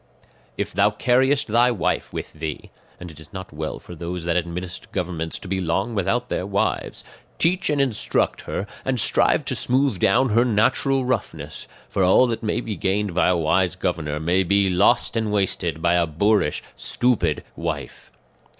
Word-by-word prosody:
"If - - -3
thou 100 +3 +4
carriest 130 +6 +2
thy 120 +3 +4
wife 115 -8 -1
with - - -6
thee 80 -2 -6 0.3
(and 90 -1 -8
it 75 - -15
is 80 -2 -14
not 95 -3 -8
well 80 +1 -4
for - - -11
those 85 +1 -5
that 85 -1 0
administer 90 +3 -4
governments 85 -5 -3
to - - -11
be 95 0 -1
long 95 +7 -1
without 115 +5 0
their 95 - -3
wives), 100 +2 -1 0.3
teach 180 +2 +1
and 150 -1 +1
instruct 130 -6 0
her, 100 - -2 0.2
and 130 -2 -1
strive - - +3
to - - 0
smooth 130 -5 +1
down 125 +9 +3
her 115 +3 +4
natural 125 +3 +2
roughness; 125 -4 -3 0.2
for 95 - 0
all 95 +7 +5
that 115 -2 -2
may 110 +2 -1
be 110 -3 -4
gained 100 0 -1
by 90 - +3
a 90 - +3
wise 90 +3 +1
governor 80 -5 -2
may 85 +4 +2
be 95 +1 +2
lost 105 +6 +3
and 110 -2 0
wasted 90 -5 -1
by 85 0 +3
a 85 -1 +2
boorish 95 0 +1
stupid 105 -11 0
wife. - - -5
95 Hz, 180 wpm, -23 LUFS, 85-115 Hz, 0.3 s, all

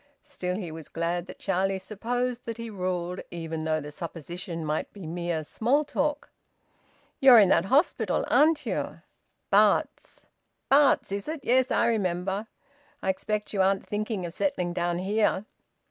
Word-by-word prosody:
Still 180 -11 -4
he 185 -5 -5
was 160 -1 -9
glad 170 +2 -2
that - - -10
Charlie 195 0 0
supposed 240 +5 -3
that 230 -1 -4
he 230 -1 -6
ruled, 180 -2 -3
even 165 -2 -5
though 155 0 +1
the 150 0 -8
supposition 170 +1 -6
might 155 +1 -2
be 200 -4 -9
mere 170 -1 -2
small 250 - +1
talk. 290 +1 -2 0.9
"You're 260 -3 +9
in 200 -4 +7
that 185 - +4
hospital, 280 - +2
aren't 305 -1 +4
you?" - - -3 0.5
"Bart's." - - +2 0.4
"Bart's, 275 -6 +4
is 200 0 -3
it? 310 -1 -4
Yes, 255 +1 +3
I - - +2
remember. 195 -1 -1 0.6
I - - 0
expect 210 +3 -2
you 195 - +2
aren't 195 +1 +2
thinking 210 -2 -3
of 170 - -6
settling 185 -12 -1
down 175 -1 -1
here?" 205 +1 +1
195 Hz, 155 wpm, -27 LUFS, 175-235 Hz, 0.9 s, You're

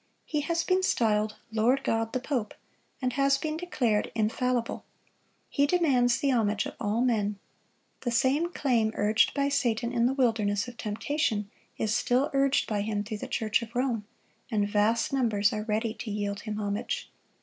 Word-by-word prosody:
He 300 -2 -1
has 335 +2 0
been 370 +1 +2
styled 215 - +1 0.2
"Lord 240 +5 +2
God 225 -3 0
the 255 - 0
Pope,"(71) 250 -5 -3 0.5
and 250 -1 0
has 275 +1 +3
been 310 +2 -3
declared 255 -11 0
infallible. 235 +2 0 0.6
He 285 0 +2
demands 265 -8 +3
the 275 +3 +1
homage 215 -4 +1
of - - -5
all 215 +2 0
men. 210 -5 +1 0.6
The 245 - -2
same 275 +8 +2
claim 235 -9 +1
urged 210 +1 +2
by 280 -1 +2
Satan 240 -4 0
in 235 -1 +3
the 265 - 0
wilderness 220 -5 +1
of 245 - -9
temptation, 215 -1 -1 0.3
is 215 -1 0
still 250 +5 +1
urged 275 0 +3
by 210 -2 -1
him 205 0 -1
through 210 0 -5
the - - -5
Church 220 0 0
of 230 +1 -9
Rome, 240 -5 0 0.4
and 210 -4 +1
vast 210 +5 +1
numbers 220 -6 +2
are 215 0 -3
ready 220 +1 -1
to 230 - -7
yield 205 -1 -2
him 215 -1 -5
homage. 210 - -3
230 Hz, 170 wpm, -28 LUFS, 210-270 Hz, 0.6 s, has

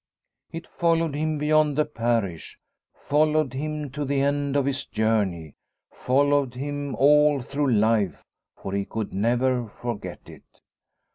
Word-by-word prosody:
It 165 +1 -7
followed 165 -2 0
him 155 +1 -1
beyond 150 -1 +2
the 150 - +3
parish, 115 - -2 0.3
followed 150 -2 +1
him 150 0 -4
to 145 +2 -4
the 140 0 0
end 140 0 0
of 140 -2 +2
his 140 0 -1
journey, 100 -8 -1 0.4
followed 140 -1 +1
him 145 +1 -4
all 150 +1 +4
through 140 +2 -1
life, 110 - +1 0.3
for 95 - -7
he 100 0 0
could 110 +1 -5
never 120 +4 +1
forget 115 0 -6
it. - - -16
140 Hz, 135 wpm, -24 LUFS, 115-150 Hz, 0.4 s, all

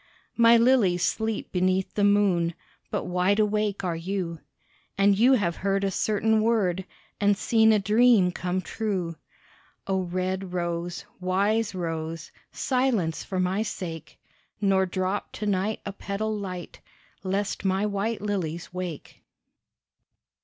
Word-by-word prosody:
My 235 0 +6
lilies 230 -8 +3
sleep 220 -1 -1
beneath 185 +1 +1
the 205 - 0
moon, 195 -5 +3 0.3
But - - -2
wide 180 +3 +1
awake 210 -1 0
are 175 -2 -1
you, 170 -1 -3 0.6
And 200 0 +4
you 240 +6 +5
have 185 -9 +1
heard 195 0 0
a 195 - +1
certain 215 +3 +1
word 195 -5 +1 0.3
And 205 -1 +3
seen 220 0 +4
a 215 - +5
dream 210 -1 +4
come 180 +1 -2
true. 185 -5 -3 0.7
Oh, 190 -1 0
red 185 +1 -3
rose, 175 0 -3
wise 200 +4 +1
rose, 165 -2 -4 0.2
Silence 250 - 0
for 185 - -3
my 185 +3 +1
sake, 165 -7 -6 0.4
Nor 195 -2 +2
drop 185 +2 -2
to 215 - -5
night 205 +1 0
a 200 - -4
petal 215 +2 -3
light 185 -4 -6 0.4
Lest 195 +1 -2
my 190 +1 +1
white 210 +1 -2
lilies 180 -5 -3
wake. 180 -4 -6
195 Hz, 130 wpm, -26 LUFS, 180-210 Hz, 0.7 s, My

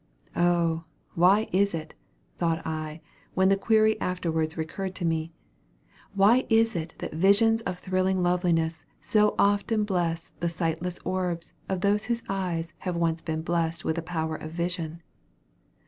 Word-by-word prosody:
Oh! 170 -2 +2 0.3
why 190 +6 +4
is 200 0 +2
it, 155 -1 -6 0.5
(thought 165 -2 0
I, 155 0 -4 0.3
when 190 0 +4
the 195 - +5
query 220 +1 +3
afterwards 160 -3 -1
recurred 185 +4 -4
to 175 - -3
me,) 165 0 -1 0.8
why 210 +6 +5
is 225 -1 +3
it 165 -1 -4
that - - -6
visions 200 +7 +4
of 180 - -4
thrilling 185 0 0
loveliness 165 -3 +1
so 210 +7 +2
often 205 +2 +2
bless 175 -4 -1
the 170 - 0
sightless 170 +1 -2
orbs 180 -2 -2 0.2
of 190 -2 -1
those 205 +1 +2
whose 235 -1 -1
eyes 175 -4 -2
have 180 -2 -3
once 165 -1 0
been 160 -1 -3
blessed 170 -1 -1
with 160 - 0
the 170 - -2
power 160 -2 -3
of 155 - -7
vision? 170 -1 -3
175 Hz, 150 wpm, -27 LUFS, 165-195 Hz, 0.8 s, the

